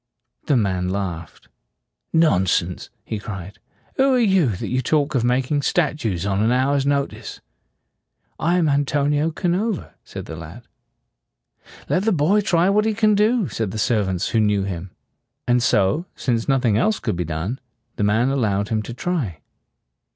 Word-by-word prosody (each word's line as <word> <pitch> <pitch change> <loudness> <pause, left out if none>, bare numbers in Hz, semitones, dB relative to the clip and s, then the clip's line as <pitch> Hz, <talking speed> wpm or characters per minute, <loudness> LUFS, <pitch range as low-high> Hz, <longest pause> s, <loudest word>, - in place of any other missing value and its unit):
The 140 - +3
man 95 -4 0
laughed. 90 -4 -5 0.6
"Non 155 - +3
sense!" 85 +1 -1 0.2
he 110 - -4
cried. 95 -2 -8 0.4
"Who 270 0 +4
are - - +3
you, 190 - +3
that - - -5
you 130 +1 0
talk 145 +2 +1
of 125 -4 +1
making 130 +4 +1
statues 140 - 0
on 100 0 0
an 110 +2 +2
hour's 135 +2 +1
notice?" 140 -1 -2 1.0
"I 170 +3 +2
am 170 -3 +2
Antonio 145 +1 +1
Canova," 180 +5 -2
said - - -8
the 80 - -7
lad. 85 +8 -10 1.2
"Let 185 +3 0
the 225 - +3
boy 180 +5 +3
try 175 -3 +2
what 210 +2 +3
he 220 -1 0
can 215 -1 +3
do," 215 0 +2
said 110 -3 -3
the 105 - -6
servants, 100 -5 0
who 115 - +1
knew 105 -2 +2
him. 95 -1 -5 0.6
And 125 0 +3
so, 130 - +2
since 115 -3 -1
nothing 125 -6 +2
else 215 - +1
could - - -2
be 90 - -2
done, 85 - -4 0.4
the - - 0
man 110 +5 +2
allowed 105 -7 0
him 110 -1 0
to 115 +2 -8
try. 130 - -2
125 Hz, 165 wpm, -21 LUFS, 100-165 Hz, 1.2 s, Who